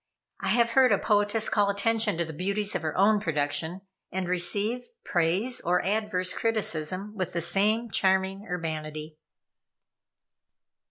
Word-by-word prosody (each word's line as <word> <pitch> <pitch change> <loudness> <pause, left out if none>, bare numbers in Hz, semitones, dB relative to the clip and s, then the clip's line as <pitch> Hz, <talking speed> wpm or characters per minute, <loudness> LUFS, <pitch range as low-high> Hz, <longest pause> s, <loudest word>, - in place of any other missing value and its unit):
I - - -4
have 235 +3 +3
heard 260 +1 +5
a - - +4
poetess 210 +1 +1
call 205 -2 +2
attention 210 0 +1
to 170 - 0
the 160 - -8
beauties 200 +5 -1
of - - -2
her 155 -2 -3
own 205 +2 +4
production, 160 +1 -2 0.3
and 185 -1 -3
receive 205 +7 0 0.2
praise 185 +9 0
or 180 +1 +1
adverse 195 -3 0
criticism 200 -2 -2
with 185 -3 -3
the 170 - -1
same 210 +6 +2
charming 190 +2 +1
urbanity. 155 -2 -5
195 Hz, 140 wpm, -27 LUFS, 170-215 Hz, 0.3 s, heard